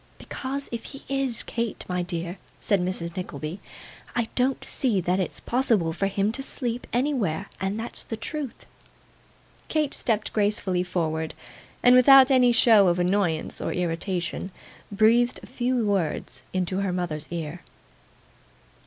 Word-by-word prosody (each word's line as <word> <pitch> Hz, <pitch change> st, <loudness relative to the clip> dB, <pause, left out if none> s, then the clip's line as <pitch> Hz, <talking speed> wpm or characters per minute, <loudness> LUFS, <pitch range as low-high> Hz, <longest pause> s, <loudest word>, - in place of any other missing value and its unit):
'Because, 275 Hz, +1 st, -5 dB
if 235 Hz, -1 st, -4 dB
he 275 Hz, -, -9 dB
is, 270 Hz, -3 st, 0 dB
Kate, 230 Hz, -2 st, -3 dB
my 180 Hz, -1 st, -1 dB
dear,' 175 Hz, +1 st, -4 dB, 0.2 s
said 200 Hz, -4 st, +1 dB
Mrs. 180 Hz, -1 st, -3 dB
Nickleby, 160 Hz, -1 st, -5 dB, 0.6 s
'I 235 Hz, -2 st, 0 dB
don't 260 Hz, +1 st, 0 dB
see 235 Hz, -8 st, +1 dB
that 180 Hz, +1 st, 0 dB
it's 185 Hz, -, -3 dB
possible 225 Hz, -10 st, +1 dB
for 195 Hz, +4 st, 0 dB
him 200 Hz, +2 st, 0 dB
to 270 Hz, -, -3 dB
sleep 245 Hz, -3 st, -3 dB
anywhere, 230 Hz, -, 0 dB
and 195 Hz, +3 st, -2 dB
that's 230 Hz, -, -5 dB
the 225 Hz, -, -5 dB
truth.' 285 Hz, +2 st, -5 dB, 1.0 s
Kate 305 Hz, -3 st, 0 dB
stepped 215 Hz, -3 st, -1 dB
gracefully 205 Hz, -3 st, +1 dB
forward, 160 Hz, -3 st, -2 dB, 0.5 s
and 245 Hz, -, +7 dB
without 265 Hz, +1 st, +8 dB
any 250 Hz, -2 st, +5 dB
show 225 Hz, -4 st, +6 dB
of 175 Hz, 0 st, +2 dB
annoyance 180 Hz, -3 st, 0 dB
or -, -, -2 dB
irritation, 175 Hz, +1 st, -2 dB, 0.4 s
breathed 230 Hz, +4 st, +3 dB
a -, -, -8 dB
few 250 Hz, -2 st, -1 dB
words 165 Hz, -9 st, -1 dB
into 185 Hz, 0 st, -1 dB
her 195 Hz, -2 st, 0 dB
mother's 170 Hz, -4 st, -3 dB
ear. 170 Hz, 0 st, -5 dB
200 Hz, 145 wpm, -25 LUFS, 175-245 Hz, 1.0 s, without